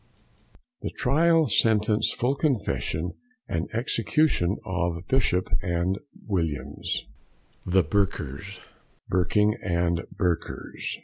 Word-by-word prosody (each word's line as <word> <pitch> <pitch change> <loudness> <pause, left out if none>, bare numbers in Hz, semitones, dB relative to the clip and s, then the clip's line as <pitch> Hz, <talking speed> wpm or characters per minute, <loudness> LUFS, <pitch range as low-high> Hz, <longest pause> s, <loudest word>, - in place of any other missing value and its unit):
THE - - -2
TRIAL, 160 +5 +3
SENTENCE, 110 -2 +3
FULL 125 +3 +1
CONFESSION, 115 - -1 0.4
AND 80 +1 -2
EXECUTION 115 - +1
OF 90 -1 -2
BISHOP 105 -8 +2 0.4
& 100 +9 -8
WILLIAMS, 75 -8 -2 0.6
THE 95 0 +4
BURKERS. 95 0 -2 0.5
BURKING 105 +4 +2
AND 85 -2 0
BURKERS. 90 -5 -2
95 Hz, 85 wpm, -26 LUFS, 85-115 Hz, 0.6 s, THE